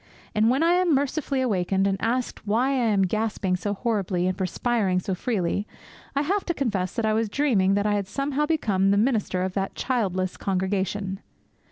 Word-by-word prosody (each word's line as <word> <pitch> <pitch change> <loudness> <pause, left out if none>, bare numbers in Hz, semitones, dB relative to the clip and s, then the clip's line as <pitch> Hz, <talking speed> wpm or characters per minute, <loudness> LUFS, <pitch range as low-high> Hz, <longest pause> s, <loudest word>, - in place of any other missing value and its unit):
And 220 +1 +3
when 265 +6 +2
I 335 - +4
am 355 -3 +3
mercifully 280 0 0
awakened, 195 -5 +1
and 195 -1 +2
asked 235 -1 -2
why 235 +6 +2
I 255 -4 +1
am 200 -2 +3
gasping 205 -1 0
so 205 +3 -2
horribly 195 -5 -1
and 185 0 0
perspiring 195 0 0
so 190 +1 -3
freely, 200 0 -1 0.5
I 280 - +2
have 390 +6 0
to 345 - -1
confess 205 - -1
that 230 - 0
I 215 - +2
was 220 0 0
dreaming 205 -8 +2
that 205 0 0
I 210 - +2
had 200 -2 -1
somehow 275 +7 -1
become 205 -12 +1
the 200 - +3
minister 210 -5 +1
of 185 0 -2
that 195 0 -2
childless 190 -8 -1
congregation. 190 0 -1
210 Hz, 190 wpm, -25 LUFS, 190-255 Hz, 0.5 s, I